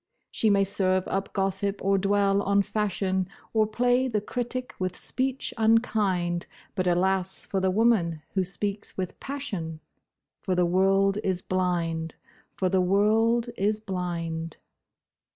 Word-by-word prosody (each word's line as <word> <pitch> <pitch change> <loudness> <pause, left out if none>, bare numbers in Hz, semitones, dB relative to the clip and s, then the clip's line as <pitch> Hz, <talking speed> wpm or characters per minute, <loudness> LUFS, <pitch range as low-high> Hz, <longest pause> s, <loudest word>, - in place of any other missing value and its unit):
She 220 - +2
may 200 -1 +4
serve 185 -1 +1
up 195 0 -2
gossip 195 0 0
or 195 0 +3
dwell 200 0 +2
on 200 0 +2
fashion, 190 -3 -1 0.3
Or 215 -1 +3
play 245 +4 +2
the 220 -4 0
critic 250 +4 -4
with 185 -1 -2
speech 265 +1 -2
unkind, 205 -6 +1 0.3
But 185 -1 -1
alas 190 +1 +2
for 195 - -1
the 190 0 +1
woman 185 -7 +2
who 190 - +1
speaks 200 +3 -4
with 185 -2 -4
passion! 200 - -4 0.6
For 185 - -1
the 180 0 +3
world 195 +3 +3
is 185 -2 -1
blind—for 175 0 -3
the 185 0 +2
world 220 +5 +2
is 210 +1 0
blind. 170 -5 -4
195 Hz, 135 wpm, -26 LUFS, 180-215 Hz, 0.6 s, may